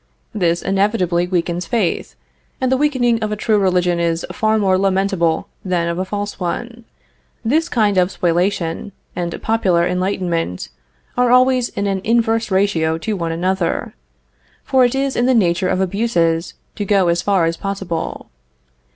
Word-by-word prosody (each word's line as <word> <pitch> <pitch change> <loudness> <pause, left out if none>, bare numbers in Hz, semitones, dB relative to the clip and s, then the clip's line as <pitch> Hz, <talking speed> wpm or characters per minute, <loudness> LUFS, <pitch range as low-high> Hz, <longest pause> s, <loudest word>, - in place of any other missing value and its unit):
This 175 -4 0
inevitably 190 -3 +1
weakens 175 -1 -1
faith, 215 -5 -1 0.4
and 260 -1 0
the - - +4
weakening 255 -5 +1
of 215 -1 -2
a - - 0
true 215 0 +1
religion 180 -2 +1
is 170 -1 0
far 220 -3 +1
more 195 -3 +2
lamentable 190 -3 +1 0.2
than 180 -3 0
of 170 +1 -2
a 185 - -1
false 205 +1 -4
one. 235 +6 -4 0.6
This 315 +8 +1
kind 210 -5 +2
of 180 0 +2
spoliation, 175 +1 -1 0.2
and 175 -1 -3
popular 185 -6 +2
enlightenment, 180 - -2 0.5
are 245 0 +2
always 255 0 +4
in 200 - -3
an 195 -1 -1
inverse 225 0 +1
ratio 190 -5 +1
to 215 +6 -3
one 170 -3 -2
another, 180 +1 -1 0.7
for 265 -2 +3
it 245 +1 +2
is 270 0 -1
in 240 - +2
the 260 - +4
nature 185 -3 +2
of - - 0
abuses 180 -4 0 0.2
to 205 - -1
go 195 -2 +2
as 170 0 +2
far 190 -3 +2
as 165 0 0
possible. 190 -3 -4
190 Hz, 160 wpm, -19 LUFS, 175-225 Hz, 0.7 s, the